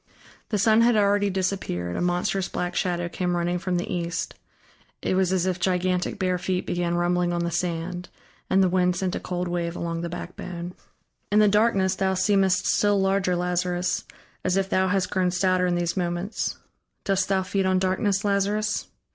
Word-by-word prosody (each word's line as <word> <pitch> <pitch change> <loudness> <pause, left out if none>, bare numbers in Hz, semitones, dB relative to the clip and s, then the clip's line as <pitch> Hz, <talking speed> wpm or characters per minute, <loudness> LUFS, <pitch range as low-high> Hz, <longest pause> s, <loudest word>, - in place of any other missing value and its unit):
The 210 - 0
sun 220 +3 +4
had 235 0 +4
already 205 -1 +3
disappeared, 185 - -2
a - - -2
monstrous 180 +2 0
black 180 0 -3
shadow 175 -2 0
came 175 +1 -1
running 175 +1 0
from 180 0 -1
the 175 - -2
east 170 -1 -3 0.7
it - - 0
was 185 -1 +2
as 185 -1 +1
if 185 -1 -1
gigantic 180 0 0
bare 185 -2 0
feet 180 0 -1
began 175 -1 -1
rumbling 175 0 +1
on 175 0 -1
the 170 - -1
sand, 175 +1 -3 0.4
and 190 0 +4
the - - +4
wind 180 0 +2
sent 185 0 -1
a - - -2
cold 180 0 -3
wave 175 -1 -2
along 170 -1 -3
the 170 - -3
backbone. 175 0 -6 0.6
"In 210 - +3
the 210 0 +6
darkness 200 -2 +3
thou 190 0 0
seemest 190 -1 +2
still 205 -1 +3
larger, 195 -1 +1
Lazarus, 180 0 -1 0.4
as 185 +1 +1
if 195 0 -1
thou 190 0 +3
hast 190 0 0
grown 185 -2 +2
stouter 185 0 +2
in 175 - +1
these 175 -1 -1
moments. 175 +3 -2 0.5
Dost 195 -1 +1
thou 190 -1 +2
feed 190 +1 0
on 185 0 +3
darkness, 190 +2 0
Lazarus? 205 +2 0
185 Hz, 185 wpm, -25 LUFS, 175-195 Hz, 0.7 s, the